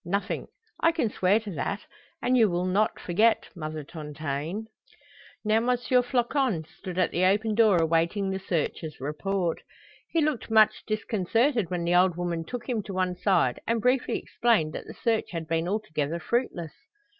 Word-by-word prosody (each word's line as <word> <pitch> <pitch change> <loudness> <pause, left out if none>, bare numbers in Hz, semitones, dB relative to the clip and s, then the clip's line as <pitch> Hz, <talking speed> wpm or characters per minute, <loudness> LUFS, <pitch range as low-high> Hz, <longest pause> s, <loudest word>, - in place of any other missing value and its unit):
Nothing, 200 +4 -2 0.3
I 330 - +5
can 245 -10 0
swear 190 +4 +3
to 210 -2 -7
that, 195 +5 -3 0.4
and 255 - +3
you 225 -4 +5
will 175 +1 -1
not 200 +4 +1
forget 215 +6 +2
Mother 155 -2 -5
Tontaine?" 155 +5 -5 0.8
Now 215 +1 +3
M. 230 +2 0
Floçon 245 - +1
stood 185 -2 -6
at 185 - +2
the 175 - 0
open 210 +3 +2
door 215 -4 +5
awaiting 170 +4 +1
the 190 - -2
searcher's 160 -3 -3
report. 170 +5 -2 0.5
He 335 - +1
looked 300 -8 0
much 215 -1 +4
disconcerted 220 - +1
when 175 -2 -2
the 170 +1 +1
old 180 -1 +4
woman 175 -2 -2
took 245 +5 -6
him 245 -3 0
on 195 - -4
one 185 -1 0
side 180 - +2
and 230 0 +1
briefly 250 +3 +1
explained 215 -11 +1
that - - -6
the - - -9
search 225 -2 0
had 165 -3 -5
been 165 +1 0
altogether 170 -7 -2
fruitless. 170 - -2
190 Hz, 165 wpm, -27 LUFS, 170-225 Hz, 0.8 s, I